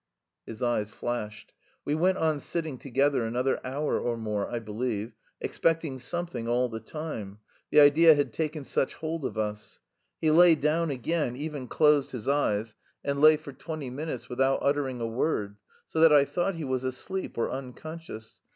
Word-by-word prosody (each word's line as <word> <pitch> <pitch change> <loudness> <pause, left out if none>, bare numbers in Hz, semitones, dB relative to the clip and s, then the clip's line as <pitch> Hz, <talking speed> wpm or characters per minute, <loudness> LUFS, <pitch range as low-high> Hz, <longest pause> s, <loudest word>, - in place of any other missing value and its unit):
His 115 +3 -6
eyes 110 -3 0
flashed. 105 -3 -5 0.3
We 145 - 0
went 185 +5 +2
on 155 -2 +1
sitting 155 -4 -4
together 135 0 +1
another 125 +4 0
hour 140 +4 -1
or 120 -1 -2
more, 105 -2 -2
I 120 - -3
believe, 110 0 -3 0.3
expecting 160 -5 0
something 170 -2 -3
all 125 +1 +1
the 115 -1 -5
time 110 -6 -6 0.3
the 150 - +6
idea 155 +3 +7
had 145 -1 -1
taken 155 -2 -2
such 135 - -1
hold 160 -2 -4
of - - -4
us. 105 -1 -4 0.4
He 155 - +2
lay 170 +1 +7
down 155 +2 +1
again, 140 0 -1
even 145 -2 -5
closed 150 -2 +3
his 120 -4 -6
eyes, 115 -6 +1 0.3
and 140 0 -1
lay 155 0 +8
for 145 -2 -10
twenty 150 -2 -6
minutes 130 -3 -5
without 135 +2 +1
uttering 140 -3 0
a 115 - -1
word, 110 -4 -1 0.3
so 160 - -3
that 165 0 +7
I 145 -2 +6
thought 180 +5 -1
he 165 - -5
was 130 -2 -2
asleep 160 +9 -4
or 115 - 0
unconscious. 135 -2 -8
135 Hz, 170 wpm, -28 LUFS, 120-155 Hz, 0.4 s, lay